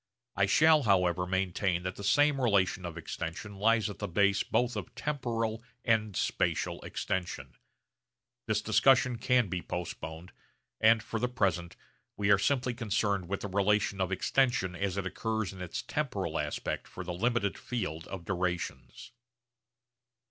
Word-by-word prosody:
I 95 0 +3
shall 155 +8 +5
however 90 -5 +2
maintain 95 -1 0
that 90 0 -3
the 100 - -8
same 145 +6 +3
relation 95 -6 +2
of 85 -1 -8
extension 85 +5 -6
lies 115 +1 +3
at 105 -5 -7
the - - -2
base 100 +2 +3
both 120 -1 0
of 105 -4 -6
temporal 115 -6 -2 0.2
and 110 -4 +2
spatial - - 0
extension. 95 -2 -4 0.9
This - - 0
discussion 120 +2 +4
can 125 -2 +3
be 90 -1 -3
postponed; 85 -1 -6 0.5
and 110 0 +5
for 115 - -3
the 125 +2 0
present 90 -8 0 0.4
we 100 0 +2
are 100 - +6
simply 125 +1 +1
concerned 105 -5 -1
with 100 - -2
the - - -3
relation 100 0 +1
of 95 0 0
extension 95 -2 +1
as 100 0 -2
it 100 - -2
occurs 110 +1 -2
in 95 - -10
its 90 - -4
temporal - - -2
aspect - - -3
for 90 - -7
the 90 0 -4
limited 110 +1 0
field 80 -10 -4
of 95 -3 -7
durations. 85 -9 -3
100 Hz, 150 wpm, -30 LUFS, 90-115 Hz, 0.9 s, are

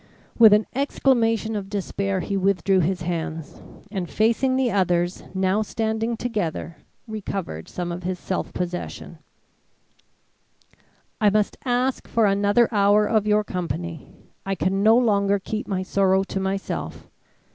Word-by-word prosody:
With 225 -2 +8
an 210 +1 +5
exclamation 230 -5 +1
of 195 -2 -4
despair, 195 -1 -2
he 200 - -3
withdrew 195 -1 +2
his 180 +1 0
hands, 165 -2 -4 0.3
and 190 -5 -3
facing 235 +4 +2
the 260 -2 +1
others 175 -2 0
now 190 +2 +1
standing 220 +2 -2
together 180 -9 -3 0.3
recovered 195 - -5
some 175 -1 -4
of 175 +1 -5
his 185 +1 -3
self 185 - -3
possession: 180 0 -5 2.0
"I 210 - +6
must 210 0 +1
ask 250 +1 0
for 230 -1 +2
another 205 +3 +3
hour 205 +1 +4
of 215 -1 +1
your 210 0 +3
company. 170 -4 -5 0.4
I 195 0 -2
can 190 +2 0
no 220 +3 +6
longer 200 -4 +3
keep 215 +3 -5
my 190 -2 -2
sorrow 190 0 +2
to 195 - -4
myself. 190 +1 -4
200 Hz, 135 wpm, -23 LUFS, 185-220 Hz, 2.0 s, With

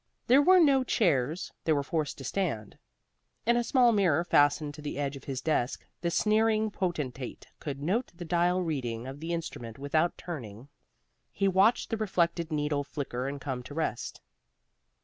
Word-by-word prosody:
There 265 +3 +6
were 370 +5 +6
no 275 -5 +5
chairs: 165 - +1
they 160 - +3
were 140 -1 +1
forced 155 0 -2
to 135 - -8
stand. 130 - -2 0.7
In 235 +1 +4
a 240 - +2
small 245 0 +4
mirror 175 -7 +3
fastened 145 -2 +3
to 150 - -10
the 145 -1 -5
edge 140 -1 -2
of 135 - -11
his 135 -2 -4
desk 135 -4 -1 0.2
the 170 - 0
sneering 215 +3 +2
potentate 150 -10 -4
could 140 -1 -5
note 215 - 0
the 175 0 -7
dial 175 +2 +2
reading 125 -8 -3
of 135 +2 -7
the 165 +2 -4
instrument 120 -9 -5
without 155 +5 0
turning. 130 - -8 0.6
He 195 - 0
watched 195 +7 +3
the 225 - 0
reflected 170 -5 0
needle 150 -1 0
flicker 135 -3 -4
and 140 0 -4
come 130 -2 -4
to 145 +4 -10
rest. 155 -8 -3
160 Hz, 170 wpm, -29 LUFS, 140-190 Hz, 0.7 s, There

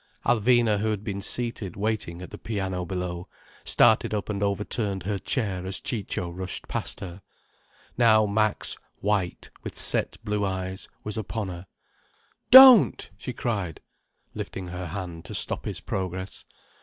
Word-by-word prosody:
Alvina, 120 -2 +3
who 110 +1 0
had 105 -2 -2
been 100 -1 -4
seated 115 -3 -3
waiting 100 -4 -3
at - - -10
the - - -8
piano 95 -4 -3
below, 90 -1 -4 0.4
started - - +4
up 105 - -4
and 100 -1 -2
overturned 100 -1 -2
her 100 +1 -2
chair 100 -8 -2
as 95 0 -2
Ciccio 95 -5 -3
rushed 90 +1 -6
past - - -4
her. 90 +1 -8 0.8
Now 110 -2 +5
Max, 110 +1 0 0.2
white, 100 -4 -2
with - - -8
set - - +4
blue 105 -1 -1
eyes, 95 -1 -3 0.2
was 105 0 -5
upon 110 0 -3
her. 90 +1 -8 0.8
"Don't—!" 260 -4 +9
she 125 - -6
cried, 105 -9 -3 0.5
lifting 95 -2 -6
her 90 0 -5
hand 85 -2 -6
to - - -7
stop - - -1
his - - -4
progress. 95 0 -4
100 Hz, 145 wpm, -26 LUFS, 90-110 Hz, 0.8 s, Don't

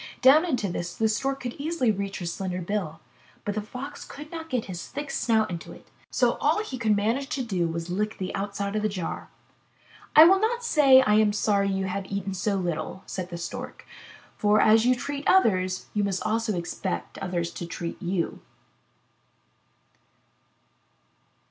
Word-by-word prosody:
Down 290 +6 +7
into 250 - 0
this 175 -1 -4
the 220 - +2
Stork 270 +5 -1
could 245 -1 -4
easily 285 -6 +1
reach 200 -1 -3
her 175 - -5
slender 180 +1 -3
bill, 170 -3 -3 0.4
but 205 - -1
the 215 - -2
Fox 255 +7 -7
could 300 +2 -10
not 325 -1 -7
get 250 -6 -1
his 180 -2 -6
thick 285 +1 -5
snout 220 -6 +1
into 170 -2 -6
it. - - -17 0.2
So - - +1
all 430 - +2
he 260 - -6
could 215 -3 +3
manage 230 +7 0
to 265 - -2
do 185 -7 0
was 165 0 -3
to 175 - -5
lick 210 +3 -1
the 185 -1 -4
outside 200 +1 -3
of 215 - +1
the 215 - +1
jar. 185 -5 -5 0.9
"I 310 - +11
will 380 +4 +6
not 470 +3 0
say 275 - +6
I 210 -3 +4
am 210 -1 +3
sorry 200 -1 +2
you 190 0 -1
have 190 +1 -3
eaten 195 -1 -2
so 200 +2 0
little," 180 0 -3
said 185 -1 -5
the 170 - -6
Stork, 170 0 -7 0.5
"for 210 0 +3
as 220 +3 +5
you 255 - +5
treat 280 +3 -4
others, 185 - +3
so 210 - +2
must 215 +3 0
you 210 - +1
expect 175 +2 -4
others 175 -3 -2
to 170 - -6
treat 170 0 -6
you.'' 175 -1 -2
210 Hz, 180 wpm, -26 LUFS, 185-255 Hz, 0.9 s, I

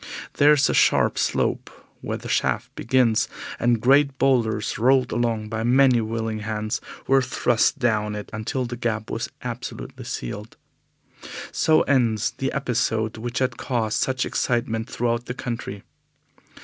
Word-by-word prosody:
There 145 +1 +6
is 140 -2 +3
a - - 0
sharp - - +3
slope - - 0 0.3
where - - -3
the - - -9
shaft - - 0
begins, 120 -3 +2 0.3
and 120 -1 +2
great 135 +3 +4
boulders, 115 -6 +1
rolled 130 +1 +3
along 115 -3 -1
by 110 0 -3
many 125 0 +4
willing 110 0 -3
hands, 110 +1 -3 0.2
were 135 0 +4
thrust 120 -2 +1
down 105 -3 0
it 105 - -6
until 110 +4 -2
the 120 0 -5
Gap 110 -2 -2
was - - -3
absolutely - - -6
sealed. 105 - -6 0.9
So 155 0 +3
ends 115 -6 +1
the 135 - -2
episode 115 -4 -1
which 120 +3 -5
has 130 -1 +1
caused 115 -4 -1
such 130 0 0
excitement 115 -2 -1
throughout 120 0 -1
the 125 - -4
country. 115 -6 -5
120 Hz, 145 wpm, -23 LUFS, 110-130 Hz, 0.9 s, There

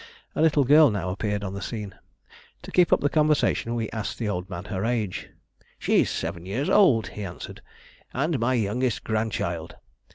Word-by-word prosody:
A - - 0
little 155 -3 +4
girl 150 +3 +7
now 95 -4 -2
appeared 105 +1 -2
on 95 -1 -4
the 100 - -5
scene. 105 -4 -5 0.7
To - - -9
keep 180 -1 +4
up - - +4
the 145 - +3
conversation 150 -6 +2
we 115 -2 -1
asked 110 -2 -4
the 115 - -2
old 90 -2 -3
man 90 0 -6
her 95 -2 -3
age. 110 -5 -2 0.5
"She's - - +2
seven 85 - -4
years 110 +10 -2
old," 140 - +5
he 105 - -7
answered, 90 -3 -8 0.5
"and 145 +2 0
my 125 +3 +1
youngest 120 +2 0
grandchild. 100 -7 -2
110 Hz, 175 wpm, -25 LUFS, 100-135 Hz, 0.7 s, girl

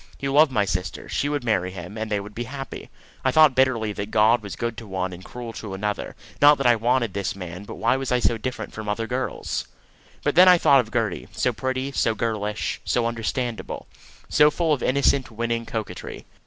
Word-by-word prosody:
He 140 - -3
loved 145 +1 +5
my 105 -5 +2
sister; 90 -4 -3
she 145 - -1
would 145 -3 -2
marry 95 -6 +1
him, 95 +2 -8
and 110 0 -4
they 105 -1 0
would 100 +1 -9
be 120 +3 -4
happy. 135 +2 -7 0.3
I 130 - +3
thought 155 +1 +6
bitterly 125 -5 +2
that 100 0 -5
God 110 +2 +4
was 100 -3 -7
good 115 -1 -3
to 115 - -8
one 95 -1 -3
and 90 +1 -10
cruel 120 +1 -8
to 105 -4 -6
another 105 +1 -3 0.3
not 145 0 +8
that 135 - -3
I 120 -1 +6
wanted 120 -1 +1
this 100 -1 -2
man, 90 0 -7
but - - -8
why 115 - +2
was 135 -1 -3
I 125 - +4
so 120 -2 +1
different 130 +3 -5
from 110 -1 -6
other 115 +2 -1
girls? 125 +3 -3 0.6
But - - +1
then 180 +3 +7
I 180 -1 +8
thought 140 -4 +5
of 110 -3 -2
Gertie, 110 -6 -1
so - - 0
pretty, 130 +1 -2
so 115 -4 +1
girlish, 105 -1 -2
so 120 - +1
understandable, 115 +1 -3 0.4
so 150 0 +5
full 160 0 +1
of 135 - -1
innocent 135 0 +2
winning 115 0 -2
coquetry. 110 -2 -6
115 Hz, 215 wpm, -24 LUFS, 105-130 Hz, 0.6 s, not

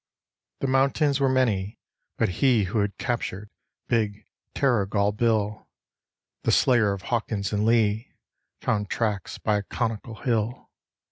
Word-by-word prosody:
The 135 - 0
mountains 135 +2 +2
were 135 -1 +3
many, 110 -6 +1 0.4
but - - +2
he 125 -6 +4
who 100 +4 -1
had 100 0 -1
captured 105 -4 -3 0.4
big 105 -3 0 0.3
Terrigal 105 -6 +2
Bill, 110 -2 0 0.7
The - - +1
slayer 120 -5 +4
of 100 -1 -7
Hawkins 105 -4 -1
and 105 +1 +1
Lee, 110 0 +2 0.5
found 105 -2 0
tracks 105 -5 -2
by 105 -1 +1
a - - -5
conical 115 -1 -3
hill. 115 -1 -2
110 Hz, 130 wpm, -25 LUFS, 105-120 Hz, 0.7 s, he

